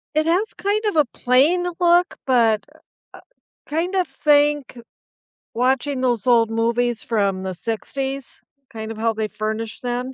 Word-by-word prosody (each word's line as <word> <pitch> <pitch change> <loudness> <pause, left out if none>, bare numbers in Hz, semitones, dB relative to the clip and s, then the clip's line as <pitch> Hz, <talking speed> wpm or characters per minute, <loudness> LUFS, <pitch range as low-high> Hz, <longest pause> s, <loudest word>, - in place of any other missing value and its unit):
It 310 0 +2
has 360 +7 +1
kind 410 +2 -1
of 415 - 0
a 305 -2 +4
plain 280 +9 +2
look, 350 0 +3
but, 230 -5 +2
u 315 - -21 0.3
uh, - - -12 0.5
kinda 355 +5 0
think, 295 -3 +2 0.8
watching 260 +3 0
those 240 -5 0
old 235 -3 +4
movies 235 +1 0
from 200 -4 0
the 190 0 -3
'60s, 265 +7 -5 0.3
kind 220 -1 -6
of 225 - -8
how 225 +1 0
they 220 0 -2
furnished 215 +2 -5
then. 250 +1 -3
250 Hz, 150 wpm, -21 LUFS, 225-300 Hz, 0.8 s, a